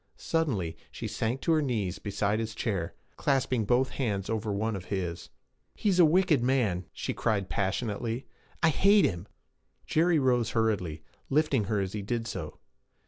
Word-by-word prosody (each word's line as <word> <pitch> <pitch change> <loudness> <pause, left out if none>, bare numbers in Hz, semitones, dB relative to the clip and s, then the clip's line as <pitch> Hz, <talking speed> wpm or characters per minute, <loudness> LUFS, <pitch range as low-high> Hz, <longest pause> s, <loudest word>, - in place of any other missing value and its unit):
Suddenly 120 - -1 0.2
she - - -5
sank 120 +4 -2
to 165 - +1
her 155 -1 +4
knees 110 -10 -1
beside 100 +1 0
his 115 -1 -3
chair, 95 -9 -2 0.2
clasping 130 -5 +1
both 125 +4 +2
hands 105 -6 -2
over 110 -1 -1
one 110 +2 -1
of 95 -2 -6
his. 90 -3 -3 0.5
'He 210 - 0
is 185 -2 +2
a 175 - +9
wicked 165 -4 +4
man!' 115 -9 +1
she - - -3
cried 100 -4 0
passionately. 110 +4 -2 0.4
'I 165 - +6
hate 200 +6 +5
him!' 85 +2 -2 0.6
Jerry 165 +1 +3
rose 125 -5 +2
hurriedly, 95 -9 0 0.3
lifting 140 -6 +2
her 105 +1 0
as 95 -1 -2
he 105 - -3
did 115 +3 -2
so. 95 -8 -5
110 Hz, 165 wpm, -29 LUFS, 100-135 Hz, 0.6 s, a